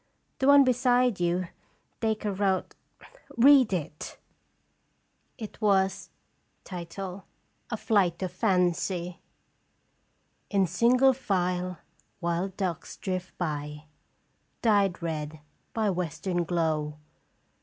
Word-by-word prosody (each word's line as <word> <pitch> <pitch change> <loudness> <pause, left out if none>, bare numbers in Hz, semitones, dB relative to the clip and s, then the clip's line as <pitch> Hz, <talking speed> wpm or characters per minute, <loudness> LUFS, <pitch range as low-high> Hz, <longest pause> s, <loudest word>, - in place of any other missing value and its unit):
The 265 - +1
one 280 0 +8
beside 250 -3 +2
you, 175 0 0 0.5
Dacre 215 -3 -1
wrote. 190 -1 0 0.6
Read 260 -2 +7
it." 160 -4 -4 1.2
It 220 -1 -9
was: 195 -2 +2 0.6
"A 175 -2 -5 0.9
FLIGHT 190 -5 +1
OF 185 - -2
FANCY. 180 -2 0 0.6
" - - -45
In 190 - +5
single 245 +9 +4
file 180 -6 -1 0.4
wild 175 +2 -2
ducks 180 -5 -3
drift 185 -1 -4
by. 150 -3 -4 0.8
Dyed 200 -6 +2
red 155 -1 -4 0.3
by 215 -3 0
western 175 0 -2
glow. 155 -3 -1
185 Hz, 90 wpm, -28 LUFS, 170-215 Hz, 1.2 s, one